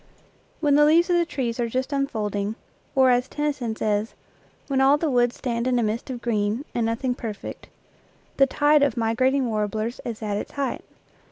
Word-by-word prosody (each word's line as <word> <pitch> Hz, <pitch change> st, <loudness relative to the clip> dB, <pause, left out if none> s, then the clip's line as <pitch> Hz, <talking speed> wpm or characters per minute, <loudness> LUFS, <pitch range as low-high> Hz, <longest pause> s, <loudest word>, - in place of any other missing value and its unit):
When 295 Hz, -3 st, +3 dB
the 295 Hz, +1 st, +6 dB
leaves 335 Hz, +4 st, +4 dB
of 350 Hz, -, +4 dB
the 340 Hz, -1 st, +1 dB
trees 245 Hz, -5 st, -3 dB
are 235 Hz, -1 st, 0 dB
just 260 Hz, +4 st, -2 dB
unfolding, 215 Hz, -7 st, -2 dB, 0.4 s
or, 260 Hz, -1 st, +5 dB
as 245 Hz, +1 st, +2 dB
Tennyson 275 Hz, -7 st, -2 dB
says, 210 Hz, 0 st, -1 dB, 0.3 s
" -, -, -34 dB
When 270 Hz, -2 st, +1 dB
all 275 Hz, +2 st, +5 dB
the 305 Hz, -1 st, -1 dB
woods 245 Hz, -1 st, +2 dB
stand 235 Hz, -1 st, -2 dB
in 250 Hz, -1 st, +2 dB
a 240 Hz, -, +2 dB
mist 220 Hz, +4 st, -2 dB
of 245 Hz, -2 st, -6 dB
green. 215 Hz, +3 st, 0 dB
And 230 Hz, -2 st, 0 dB
nothing 245 Hz, +3 st, -1 dB
perfect," 220 Hz, -4 st, -7 dB, 0.7 s
the 275 Hz, -, +5 dB
tide 295 Hz, +2 st, +3 dB
of 280 Hz, -5 st, +2 dB
migrating 255 Hz, +4 st, +1 dB
warblers 215 Hz, +1 st, -2 dB
is 230 Hz, -2 st, -6 dB
at 205 Hz, -1 st, -1 dB
its -, -, -6 dB
height. 280 Hz, -1 st, -3 dB
245 Hz, 190 wpm, -24 LUFS, 225-275 Hz, 0.7 s, the